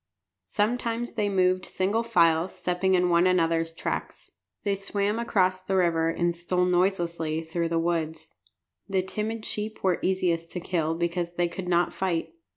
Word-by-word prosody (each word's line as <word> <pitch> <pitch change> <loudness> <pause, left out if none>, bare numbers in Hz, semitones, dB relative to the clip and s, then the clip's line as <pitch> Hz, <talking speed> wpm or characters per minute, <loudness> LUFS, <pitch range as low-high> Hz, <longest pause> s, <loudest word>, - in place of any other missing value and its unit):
Sometimes 230 - -1
they 210 -2 0
moved 185 -1 +2
single 200 +5 0
file, 170 -6 +3
stepping 185 +1 0
in 180 0 +3
one 170 +1 +4
another's 165 -2 +2
tracks. 165 - -5 0.3
They 200 - +1
swam 200 +2 -1
across 185 -5 +1
the 190 +1 -2
river 165 -3 +2
and 170 +1 0
stole 180 +1 0
noiselessly 170 -3 0
through 165 +1 -2
the 165 - 0
woods. 165 -1 -2 0.6
The 190 -1 +1
timid 215 +3 -4
sheep 215 +1 -3
were 185 -2 +2
easiest 175 -3 0
to 180 - -3
kill 165 -2 -1
because 170 0 -2
they 175 0 +2
could 180 +2 -6
not 175 0 +2
fight. 185 - -2
180 Hz, 160 wpm, -27 LUFS, 170-195 Hz, 0.6 s, one